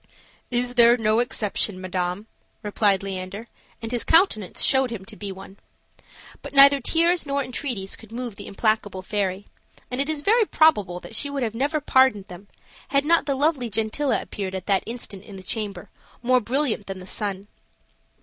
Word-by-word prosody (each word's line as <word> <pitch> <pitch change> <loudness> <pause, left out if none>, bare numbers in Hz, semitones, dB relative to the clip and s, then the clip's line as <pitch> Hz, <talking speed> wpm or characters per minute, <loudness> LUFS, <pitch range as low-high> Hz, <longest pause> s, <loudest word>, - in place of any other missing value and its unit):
"Is 245 0 -1
there 240 0 +6
no 220 -1 +2
exception, 210 -4 -1
madam?" 185 +1 -3 0.4
replied 205 -2 +1
Leander, 195 +2 -5 0.4
and 225 - -4
his 240 -2 0
countenance 320 - +2
showed 265 -1 +4
him 215 -5 -7
to 215 - -9
be 205 -1 -6
one. 190 +1 -11 0.8
But - - -9
neither 275 0 +7
tears 335 +4 +2
nor 280 0 0
entreaties 245 -6 -4
could 225 -1 -16
move 240 -2 -5
the 200 - -9
implacable 205 -2 -1
fairy; 200 -1 -2 0.5
and 250 +2 0
it 280 - -2
is 300 -2 -1
very 445 +4 +4
probable 210 - +3
that - - -11
she 285 +6 +1
would 280 -2 -3
have 220 -2 -2
never 285 +6 0
pardoned 260 -8 +3
them, 180 +3 -11 0.4
had 280 0 +1
not 335 +1 +3
the 280 - +1
lovely 275 -4 +1
Gentilla 225 +7 0
appeared 190 -3 -5
at 190 -1 -5
that 195 -2 +2
instant 225 -4 -7
in 205 -2 -11
the 190 - -10
chamber, 200 -2 -5 0.3
more 255 +1 +4
brilliant 240 -3 0
than 195 -1 -5
the 185 - -10
sun. 200 0 -4
225 Hz, 180 wpm, -24 LUFS, 195-270 Hz, 0.8 s, neither